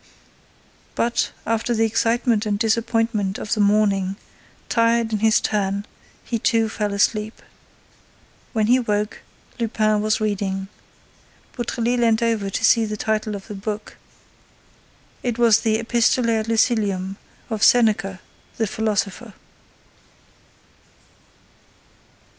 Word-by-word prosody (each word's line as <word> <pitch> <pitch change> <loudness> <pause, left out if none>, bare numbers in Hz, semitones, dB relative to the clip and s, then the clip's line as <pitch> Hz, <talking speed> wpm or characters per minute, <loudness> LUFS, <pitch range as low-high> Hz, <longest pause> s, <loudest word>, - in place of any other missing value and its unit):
But, 235 0 0 0.2
after 230 +1 0
the 225 0 +2
excitement 230 0 +1
and 205 -1 0
disappointment 225 -2 0
of 210 - -3
the 220 - -2
morning, 200 -2 +2 0.5
tired 230 -1 +2
in 215 - 0
his 220 +1 +4
turn, 200 -1 -1 0.4
he 230 - -2
too 225 0 +2
fell 210 -1 -2
asleep. 210 +2 0 1.1
When 220 -2 +1
he 245 +4 +4
woke, 210 -3 -2 0.4
Lupin 215 -2 +1
was 215 0 +1
reading. 195 -2 -2 0.9
Beautrelet 240 0 -1
leant 230 -1 +2
over 225 -4 0
to - - -1
see 230 - +5
the 215 -1 -3
title 215 -1 -1
of 195 - -9
the 210 - -7
book. 205 +2 -6 1.2
It 240 -2 -2
was 235 -2 +5
the 220 -1 +1
Epistolæ 230 0 +2
ad 220 - -4
Lucilium 205 -4 0 0.3
of 220 -2 -3
Seneca 210 -6 +3 0.4
the 225 - +1
philosopher. 215 0 -2
220 Hz, 115 wpm, -22 LUFS, 205-230 Hz, 1.2 s, see